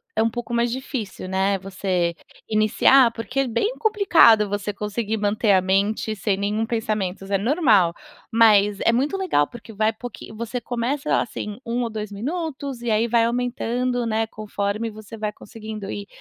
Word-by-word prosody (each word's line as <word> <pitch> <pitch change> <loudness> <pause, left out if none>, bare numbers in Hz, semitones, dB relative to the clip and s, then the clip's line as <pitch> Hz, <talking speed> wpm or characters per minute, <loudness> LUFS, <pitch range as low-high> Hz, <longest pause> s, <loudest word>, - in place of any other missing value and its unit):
é - - +3
um 230 - +2
pouco 240 +1 -6
mais 235 0 +1
difícil, 240 -7 -5
né, 190 +1 +1
você 185 -3 -1 0.3
iniciar, 225 +4 +5
porque 240 +4 -2
é 270 - -1
bem 250 - -1
complicado 360 - +5
você 205 0 -3
conseguir 210 +2 -3
manter 210 +1 +1
a 190 -1 +5
mente 200 +3 0
sem 195 0 -1
nenhum 210 +3 -1
pensamentos, 215 -5 -2
é 200 - +2
normal. 215 - +3 0.4
Mas, 210 -3 +5
é - - +4
muito 280 +10 +1
legal, 365 - +2
porque 225 -1 -12
vai 215 +2 +1
pouquinho 240 -1 -9
você 235 +2 -4
começa, 245 +5 -1
assim, 210 -2 -5
1 240 +1 -1
ou 230 - -2
2 215 -1 -5
minutos, 275 - -4
e 240 - -3
aí 220 +2 +2
vai 230 0 +3
aumentando, 245 0 -1
né, 225 0 +1
conforme 215 +1 -3
você 215 +1 -10
vai 210 -1 -2
conseguindo 215 -2 -8
ir. 200 -1 -6
220 Hz, 170 wpm, -23 LUFS, 205-240 Hz, 0.4 s, iniciar